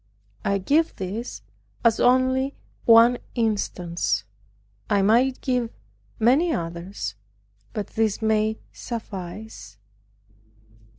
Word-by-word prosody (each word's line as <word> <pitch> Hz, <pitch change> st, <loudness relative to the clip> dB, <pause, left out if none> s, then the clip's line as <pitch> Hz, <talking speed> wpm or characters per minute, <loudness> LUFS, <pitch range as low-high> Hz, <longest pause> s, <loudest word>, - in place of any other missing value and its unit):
I 200 Hz, -, +1 dB
give 295 Hz, -, +2 dB
this 195 Hz, -, -5 dB, 0.4 s
as 230 Hz, -1 st, +4 dB
only 260 Hz, +2 st, +3 dB, 0.3 s
one 235 Hz, +1 st, +7 dB, 0.2 s
instance. 180 Hz, -, -1 dB, 0.7 s
I 200 Hz, -1 st, +3 dB
might 245 Hz, +6 st, +3 dB
give 250 Hz, -3 st, 0 dB, 0.5 s
many 275 Hz, +10 st, +3 dB
others, 170 Hz, -, -4 dB, 0.6 s
but 210 Hz, -, -3 dB
this 220 Hz, -2 st, 0 dB
may 220 Hz, 0 st, +1 dB
suffice. 205 Hz, -, -7 dB
220 Hz, 85 wpm, -24 LUFS, 195-245 Hz, 0.7 s, one